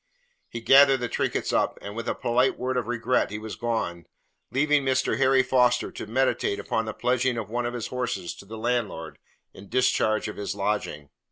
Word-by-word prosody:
He 115 - -6
gathered 135 +2 +7
the 125 - -2
trinkets - - -1
up, - - +1
and 100 +1 -8
with 115 0 -4
a - - -1
polite 125 +1 +1
word 130 +1 -2
of 125 -3 -1
regret 120 +1 0
he 105 - -5
was 110 0 -7
gone, 100 -8 -3 0.4
leaving 145 +1 +2
Mr. 130 0 +1
Harry 130 0 +4
Foster 125 -1 +2
to - - -7
meditate 115 -4 0
upon 110 +2 -1
the 110 - -4
pledging 125 0 +1
of 110 -2 -5
one 120 0 -1
of 120 - -4
his 120 - -4
horses 120 -8 -3
to - - -12
the 110 +3 -8
landlord 110 -8 -2 0.3
in 100 +1 -13
discharge 125 -4 +1
of 105 - -7
his 100 -1 -4
lodging. 100 -8 -3
120 Hz, 195 wpm, -26 LUFS, 105-130 Hz, 0.4 s, gathered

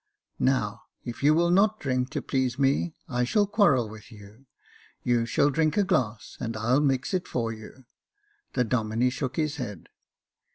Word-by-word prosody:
Now, 120 -6 +1 0.2
if 120 - -6
you 150 +2 +5
will 170 +1 +3
not 205 +4 +3
drink 130 -2 -1
to - - -4
please 130 -2 -1
me, 140 +4 +1
I 125 -2 0
shall 205 - +2
quarrel 195 - +3
with 110 +2 -12
you. 105 +5 -15 0.6
You 120 -1 +1
shall 145 +5 +2
drink 155 +4 +1
a 205 - +4
glass, 120 - -1
and 115 -1 -4
I'll 120 +5 +2
mix 135 0 0
it 180 -1 -1
for 115 -2 -2
you. 110 +4 -12 0.7
The 125 - +2
Domine 115 +1 0
shook 130 -1 -4
his 155 -1 -1
head. 105 - -6
130 Hz, 170 wpm, -27 LUFS, 115-150 Hz, 0.7 s, you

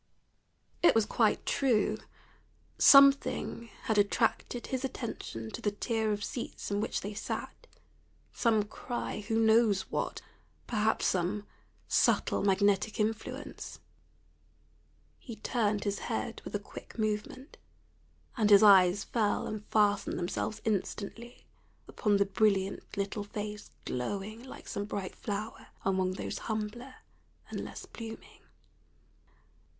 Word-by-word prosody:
It 345 - +6
was 225 -2 +4
quite - - +1
true. 250 -6 +2 0.8
Something 275 -4 +6
had 220 -2 +2
attracted 225 +3 +1
his 260 0 -3
attention 220 - -5
to - - -6
the 205 - +1
tier 220 +1 -1
of 205 0 -2
seats 235 -3 -5
in 205 0 +1
which 220 - -2
they 205 +2 -5
sat, - - -5 0.7
some 220 -3 +2
cry 240 +3 -5
who 225 0 +1
knows 220 -3 +4
what? - - -2 0.4
perhaps 220 -1 +1
some 190 +3 0 0.4
subtle - - +2
magnetic 200 +2 +2
influence. 215 0 -3 1.4
He 230 - -8
turned 210 -4 0
his 200 -1 -1
head - - -3
with - - -6
a - - 0
quick - - -11
movement, 215 +6 -3 0.8
and 215 -4 +2
his 205 0 +8
eyes 195 -1 +7
fell 215 -4 0
and 215 -1 -5
fastened 205 -2 +2
themselves 215 +5 -3
instantly 220 +2 -3 0.4
upon 210 -3 +1
the 200 - +3
brilliant 195 -1 0
little 200 +1 -2
face 210 0 -6 0.2
glowing 200 - -3
like 260 - -11
some 200 - -3
bright 200 -2 -5
flower 210 +1 -5 0.2
among 190 -1 +1
those - - -4
humbler 220 +4 -4 0.6
and - - -3
less - - -8
blooming. 225 -1 -10
210 Hz, 120 wpm, -31 LUFS, 200-225 Hz, 1.4 s, his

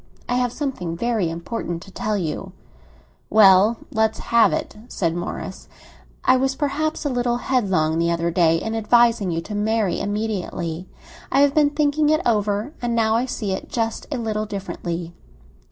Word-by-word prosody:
I - - -1
have 245 -1 +1
something 205 - -4
very 225 -5 0
important 170 0 -5
to 195 - -14
tell 215 +2 -2
you." 160 -5 -4 0.8
"Well, 205 +1 +6
let's 220 0 +1
have 235 -1 +3
it," - - -3
said 170 -8 -1
Morris. 175 +2 -6 0.6
"I 255 - +5
was 265 +1 0
perhaps 305 +2 -2
a - - +1
little 245 -2 0
headlong 190 -12 +1
the 170 0 +2
other 170 0 0
day 165 -1 +3
in 225 - -4
advising 225 -2 +3
you 165 -1 -1
to 205 +5 -8
marry 210 -2 0
immediately. 190 -5 -3 0.4
I 275 - +4
have 285 -1 +4
been 295 -1 +4
thinking 295 0 +1
it 310 0 +3
over, 210 +3 0
and 240 -1 -1
now 220 -1 +2
I 240 +3 +1
see 210 -5 -3
it 190 - -4
just 225 -2 -2
a 280 - -1
little 215 -2 -2
differently." 175 -4 -5
220 Hz, 170 wpm, -22 LUFS, 180-245 Hz, 0.8 s, Well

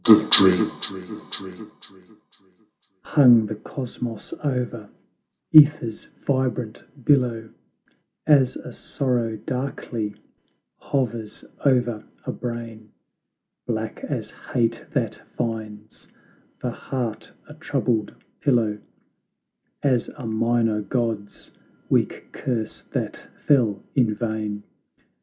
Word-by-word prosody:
The 105 -1 +8
Dream. 95 -2 +8 2.3
Hung 120 -6 +6
the 105 - -4
Cosmos 115 0 -6
over 125 -6 -2 0.6
JEther's 145 -7 +6 0.2
vibrant 125 -4 -1 0.2
billow, 120 -6 +2 0.7
As 140 -4 +4
a - - -8
sorrow 120 -4 -1
darkly 120 -3 -4 0.6
hovers 115 -5 -3 0.2
o'er 120 -5 +2 0.2
a - - -2
brain; 115 -2 -6 0.8
Black - - -3
as - - -4
hate 115 -1 -1
that - - -1 0.2
finds 110 -2 -5 0.6
the - - -1
heart 115 -5 -4 0.2
a 150 - -11
troubled 125 -8 -1 0.2
pillow; 115 -6 +2 1.0
As 130 -4 +2
a 130 - -7
minor 115 -1 +1
god's 110 -2 -3 0.4
weak - - +1
curse 115 -4 -3
that - - -4 0.2
fell 115 -8 +3
in 115 -6 +2
vain! 105 -2 -3
115 Hz, 90 wpm, -24 LUFS, 110-125 Hz, 2.3 s, The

